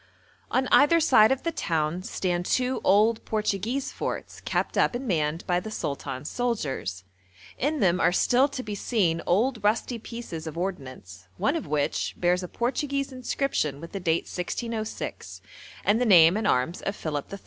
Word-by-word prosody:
On 260 0 +1
either 315 +4 +6
side 245 -8 +5
of 265 0 0
the 335 - 0
town 165 - -1
stand 180 -1 -2
two 255 0 0
old 215 +4 +3
Portuguese 220 +5 -1
forts - - -5
kept - - -1
up - - +2
and 255 +2 -4
manned 160 -3 -1
by 175 -1 +1
the 220 - -7
sultan's 140 -7 -4
soldiers; 145 - -2 0.6
in 295 +3 0
them 180 -2 +3
are - - +4
still 250 +8 +3
to 275 -2 -6
be 210 - -5
seen 195 -6 0
old 220 +5 +1
rusty 230 +3 +1
pieces 215 -9 -7
of 160 - -6
ordnance, 130 - -6
one 285 - +1
of 330 - -4
which 145 -1 -1
bears 180 +1 +2
a 180 - -5
Portuguese 275 - -2
inscription 255 - -1
with 165 +2 -9
the 195 - -4
date 170 -2 +1
1606, 220 +4 -5 0.5
and 215 +4 +3
the - - +3
name 175 -4 +7
and 220 - 0
arms 130 +8 +1
of 200 - -3
Philip 150 -6 -4
III. 200 - -6
200 Hz, 170 wpm, -26 LUFS, 165-245 Hz, 0.6 s, name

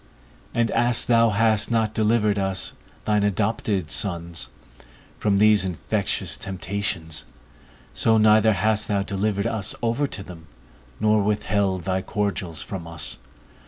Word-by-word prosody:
And 115 -1 0
as 120 -1 +3
thou 115 -1 +4
hast 110 0 +2
not 110 -2 +1
delivered 105 -2 +2
us, 95 -1 -1 0.3
thine 105 -1 +2
adopted 100 -3 0
sons, 85 -4 -2 0.7
from 100 -2 +2
these 105 -1 +5
infectious 90 -3 -2
temptations, 95 -4 -3 0.7
so 110 -1 +3
neither 110 0 +5
hast 105 +1 +1
thou 100 -1 0
delivered 100 +1 -1
us 110 -4 -2
over 120 +5 +1
to 100 - -7
them, 80 -4 -12 0.5
nor 105 0 +3
withheld 100 -2 0
thy 95 +1 -1
cordials 100 -5 -3
from 90 -4 -7
us. 80 -1 -4
105 Hz, 125 wpm, -23 LUFS, 95-110 Hz, 0.7 s, these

